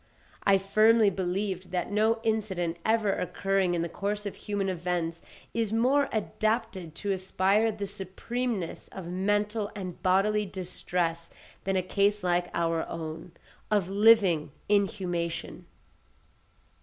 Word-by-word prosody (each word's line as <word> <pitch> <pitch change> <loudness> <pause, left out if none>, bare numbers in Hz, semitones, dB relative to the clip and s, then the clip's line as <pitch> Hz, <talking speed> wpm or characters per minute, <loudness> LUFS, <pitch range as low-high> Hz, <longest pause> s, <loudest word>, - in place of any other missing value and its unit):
I 195 -1 +6
firmly 215 +2 +4
believed 185 0 -2
that 180 +3 -2
no 220 +2 +2
incident 195 -7 -1
ever 220 -3 +2
occurring 195 -1 0
in 170 - 0
the - - -1
course 205 +4 -3
of 205 - -3
human 205 -2 -2
events 175 -2 -2 0.3
is 225 -3 0
more 260 +6 +3
adapted 215 -5 -1
to 200 +2 -2
inspire 195 +3 +2
the 205 -1 -4
supremeness 200 +1 -4
of 190 -3 -7
mental 205 +4 0
and 185 -4 -6
bodily 205 +3 +2
distress 180 -2 -2 0.4
than 195 0 0
a 185 - +1
case 200 +2 +1
like 175 0 +1
our 165 -1 0
own, 165 +1 -6 0.4
of 200 -3 +1
living 200 -8 +5 0.2
inhumation. 185 -5 -1
195 Hz, 125 wpm, -28 LUFS, 180-210 Hz, 0.4 s, I